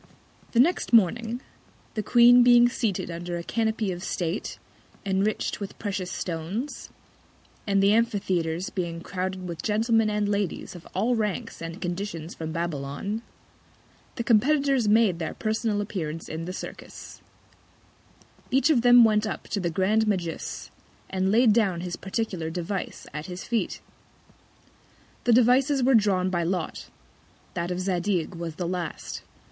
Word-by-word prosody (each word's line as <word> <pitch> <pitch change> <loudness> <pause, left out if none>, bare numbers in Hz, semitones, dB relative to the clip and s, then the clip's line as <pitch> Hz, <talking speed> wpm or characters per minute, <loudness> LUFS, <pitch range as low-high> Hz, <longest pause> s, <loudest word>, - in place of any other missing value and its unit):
The 235 - +3
next 325 0 +2
Morning 230 +3 +3 0.5
the 215 - -1
Queen 240 +2 +7
being 240 0 +7
seated 220 -7 -2
under 175 +1 -4
a 170 - -5
Canopy 220 -1 -1
of 175 0 -6
State, 175 +1 -3 0.5
enrich'd 195 +2 0
with 200 -2 -7
precious 190 -3 -3
Stones; 180 - -4 0.8
and 195 -1 +3
the 200 +1 +5
Amphitheatres 185 -6 0
being 170 -3 -3
crowded 185 0 -4
with 170 -2 -5
Gentlemen 225 +2 +2
and 210 -1 0
Ladies 205 -3 -2
of 175 -2 -12
all 225 +6 +2
Ranks 210 -7 -3
and 165 +3 -6
Conditions 175 -3 -4
from 160 -1 -5
Babylon; 165 +5 -3 0.9
the 235 - -2
Competitors 270 +1 +3
made 210 -5 +4
their 160 - -4
personal 215 -1 -1
Appearance 165 -6 -4
in 160 +1 -5
the 180 - -4
Circus: - - -11 1.3
Each 270 +4 +3
of 255 -6 +4
them 245 0 +8
went 215 -1 +3
up - - -4
to 205 - -1
the 175 -2 -1
grand 205 +6 +2
Magus, 180 -5 -3 0.4
and 190 0 +1
laid 225 0 +5
down 195 -7 +1
his 180 -1 -4
particular 195 -5 -3
Device 180 +3 -4
at 150 +1 -5
his 180 0 -6
Feet. 235 -2 -2 1.4
The 245 - +4
Devices 255 +3 +4
were 265 +2 +4
drawn 195 -5 +3
by 175 -2 0
Lot: 175 -1 -3 0.6
That 170 0 -2
of 180 0 -2
Zadig 185 -1 -1
was 165 -2 -5
the 175 0 -3
last. 175 -1 -4
195 Hz, 145 wpm, -26 LUFS, 175-225 Hz, 1.4 s, them